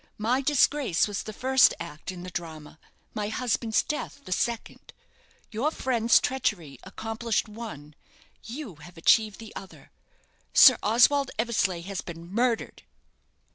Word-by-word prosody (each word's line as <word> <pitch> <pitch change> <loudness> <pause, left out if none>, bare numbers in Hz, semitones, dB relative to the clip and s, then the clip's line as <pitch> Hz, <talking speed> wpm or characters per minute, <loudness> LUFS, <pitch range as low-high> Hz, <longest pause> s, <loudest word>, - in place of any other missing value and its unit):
My 240 +5 +1
disgrace 275 - +2
was 205 -1 -3
the 215 - -7
first 260 +4 +4
act 170 0 -7
in 180 -1 -9
the 185 - -8
drama, 160 -3 -8 0.3
my 210 -1 -3
husband's 225 0 0
death 300 -1 -5
the - - -10
second. 230 +5 -3 0.6
Your 240 +7 0
friend's 235 -6 +2
treachery 200 - -2
accomplished 225 +3 -3
one, 210 -10 -9 0.5
you 230 - -8
have 165 +3 -14
achieved 215 +5 +3
the 225 -1 -12
other. 190 - -11 0.6
Sir 255 -3 +8
Oswald 250 +5 +4
Eversleigh 215 -6 0
has 195 +1 -5
been 170 +1 -10
murdered!" 235 0 -1
220 Hz, 135 wpm, -26 LUFS, 180-245 Hz, 0.6 s, Sir